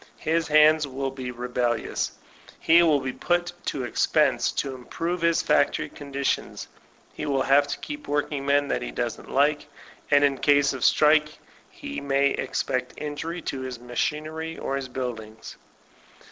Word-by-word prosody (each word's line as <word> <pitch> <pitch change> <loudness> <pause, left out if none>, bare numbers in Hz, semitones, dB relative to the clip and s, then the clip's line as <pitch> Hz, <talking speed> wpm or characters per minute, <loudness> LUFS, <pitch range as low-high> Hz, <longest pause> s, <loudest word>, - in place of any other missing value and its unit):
His 165 +1 0
hands 155 0 +5
will 135 0 -3
be 130 -2 -6
rebellious, 125 -1 -2 0.5
he 170 +1 +5
will 155 -5 +3
be 130 -1 -3
put 175 0 -1 0.2
Id 135 - -4
expense 120 - +2
to 135 - -2
improve 165 +7 -4
his 170 -1 +2
factory - - +2
conditions, 140 -1 -3 0.5
he - - -5
will 135 -2 +1
have 140 +1 +4
Id 145 - -4
keep 295 0 -7
workingmen 145 -1 0
that - - -1
he - - -4
doesn't - - -4
like, 145 +2 +2 0.4
and 145 -1 +5
in 140 -2 +2
case 145 -1 +3
of 130 - -5
strike 150 0 +4 0.3
he 285 0 -7
may 140 0 +2
expect 125 0 -2
injury 150 +3 -5
to 135 - -4
his 130 -1 -5
machinery 155 +6 -3
or 135 - -3
his 135 -2 -4
buildings. 115 -4 -6
145 Hz, 150 wpm, -25 LUFS, 130-155 Hz, 0.5 s, hands